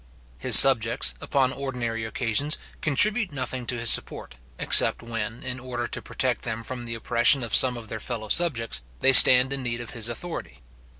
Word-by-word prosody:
His - - +7
subjects, 115 -4 +4
upon 135 -2 -2
ordinary 120 -5 -7
occasions, 125 +6 -3 0.2
contribute 205 - -1
nothing 130 -2 -6
to 125 - -4
his 115 -1 +3
support, - - -2 0.2
except - - +3
when, 115 0 -8
in 125 0 -6
order 125 -2 -7
to - - -7
protect 130 -2 -4
them 115 -1 -6
from 125 0 -7
the 115 0 -7
oppression 120 +3 +1
of 115 - -7
some 125 -2 +4
of 115 -2 -12
their 110 - -9
fellow 110 -3 -7
subjects, 115 - -2 0.2
they 135 - +3
stand 130 +1 +7
in 135 - -3
need 120 -2 -6
of 120 - -10
his 115 0 -4
authority. 115 - -9
120 Hz, 180 wpm, -22 LUFS, 115-130 Hz, 0.2 s, His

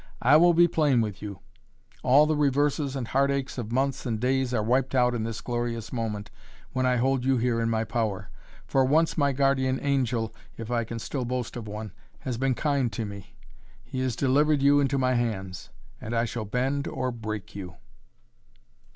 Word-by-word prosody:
I 135 +5 +6
will 170 +2 +6
be 175 +1 +6
plain 150 -6 +2
with 105 -3 -4
you. 100 -2 -7 0.6
All 140 +4 +5
the 155 0 +1
reverses 145 0 +1
and 130 -4 -3
heartaches 140 0 0
of 115 -2 -5
months 135 +2 0
and 115 -3 -2
days 130 +1 +1
are 115 -4 0
wiped 130 +4 +1
out 125 -1 +3
in 115 -2 -2
this 115 0 -5
glorious 120 -2 -3
moment 105 -3 -3 0.4
when 130 0 0
I 125 - +3
hold 130 +1 +1
you 135 0 +2
here 120 -1 +1
in 115 - 0
my 110 -1 +1
power. 110 -4 -2 0.3
For 135 - +2
once 155 +5 +2
my 140 -2 +2
guardian 135 -1 +1
angel, 125 -5 0 0.2
if 115 +1 -6
I 120 -1 0
can 115 +1 -6
still 130 +3 -4
boast 125 -1 -3
of 115 -3 -6
one, 105 0 -6 0.3
has 120 -3 -4
been 135 -1 +1
kind 140 -2 0
to 115 - -3
me. 100 -2 -10 0.5
He 130 - -6
has 130 -3 -1
delivered 145 +2 +2
you 145 +1 +5
into 140 -1 +1
my 130 -1 +2
hands 100 -6 -3 0.3
and 115 +2 -4
I 115 +1 +2
shall 115 -1 -4
bend 130 +6 -1
or 130 0 -2
break 110 -3 -6
you!" 90 -4 -7
125 Hz, 195 wpm, -27 LUFS, 115-135 Hz, 0.6 s, I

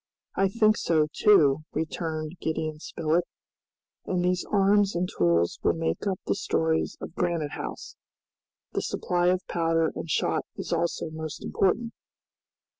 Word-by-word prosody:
"I 195 - +3
think 215 +1 +3
so, 155 -2 +2
too," 155 -9 +5
returned 160 +1 -3
Gideon 155 -1 -2
Spilett, 165 +2 0 0.8
"and 180 -1 0
these 180 0 +1
arms 200 0 +3
and 175 +1 0
tools 85 - +1
will - - +3
make 165 +5 -2
up 190 -2 -1
the - - +1
stores 160 0 0
of - - -7
Granite 170 -5 -1
House. - - -6 0.8
The - - -1
supply 175 0 0
of 180 +1 +2
powder 165 -1 +1
and 165 - -6
shot - - +1
is - - -4
also 170 -1 -1
most 155 -2 -6
important." 230 +5 +1
165 Hz, 140 wpm, -27 LUFS, 155-185 Hz, 0.8 s, too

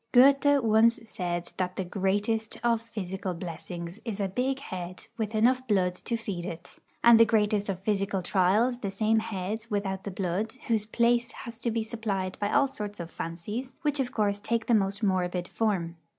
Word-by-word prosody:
Goethe 280 +3 +6
once 225 +1 +4
said 175 -5 -3
that 185 -1 -1
the 190 - -2
greatest 205 +4 0
of 235 -1 +2
physical 190 -4 -4
blessings 170 +2 -6
is 220 -4 -4
a 200 - +1
big 255 +7 -1
head 185 -7 -6
with 220 -1 -3
enough 255 +4 +3
blood 185 -4 +2
to 230 +6 -3
feed 200 -6 -4
it, 170 -2 -7 0.3
and 235 -1 +8
the - - +10
greatest 210 -2 +2
of 185 -2 -3
physical 195 -2 0
trials 210 +8 +2
the 200 - -3
same 215 +3 +2
head 215 +1 -4
without 195 -2 -2
the - - -4
blood, 190 +3 -2
whose 220 -3 +1
place 235 +2 +2
has 235 -3 -8
to 235 - -1
be 225 0 0
supplied 205 -5 -3
by 205 0 0
all 280 -1 +4
sorts 210 -6 -6
of 170 -1 -6
fancies, 210 +10 -5
which 295 -1 +1
of 255 -2 0
course 205 -2 0
take 230 +2 -1
the 240 - +2
most 200 0 +1
morbid 180 -2 0
form. 180 -7 -1
210 Hz, 185 wpm, -28 LUFS, 185-230 Hz, 0.3 s, the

